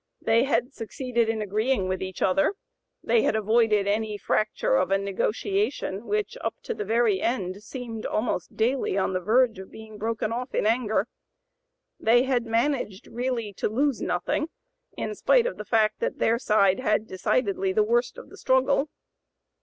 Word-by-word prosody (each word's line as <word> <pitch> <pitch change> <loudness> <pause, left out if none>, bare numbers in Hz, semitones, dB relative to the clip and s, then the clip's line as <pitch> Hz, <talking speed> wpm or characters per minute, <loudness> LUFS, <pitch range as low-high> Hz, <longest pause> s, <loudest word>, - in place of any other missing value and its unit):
They 230 +2 +3
had 250 0 0
succeeded 235 0 -2
in 220 -1 -1
agreeing 215 +1 0
with 185 0 -2
each 190 -1 -4
other; 195 - +2 0.5
they 465 - +3
had - - +1
avoided 215 -1 +2
any 210 +1 -1
fracture 220 - 0
of - - +2
a 195 - +3
negotiation 210 - -2
which, 425 0 -1
up - - -2
to 470 - -3
the - - -4
very 220 -2 +2
end, 200 -5 -2
seemed 225 -1 -6
almost 220 +3 -2
daily 235 -2 +1
on 190 -1 0
the 185 - 0
verge 225 +3 +2
of 190 - -9
being 220 -1 -11
broken 220 0 -2
off 250 +3 -4
in - - +1
anger; 220 -2 +1 0.9
they 240 +3 +4
had 250 -3 0
managed 230 -4 -1
really 240 -3 -3
to - - -2
lose 270 +3 0
nothing, 305 - -1 0.5
in - - -3
spite 475 +3 +3
of - - -3
the - - -7
fact 215 -2 +2
that - - -2
their 230 +1 +2
side 200 -4 +3
had 215 -5 +2
had 220 - -19
decidedly 370 - 0
the 430 +2 +3
worst 475 +3 0
of - - -11
the 400 - -12
struggle. 265 0 +2
225 Hz, 175 wpm, -26 LUFS, 210-260 Hz, 0.9 s, they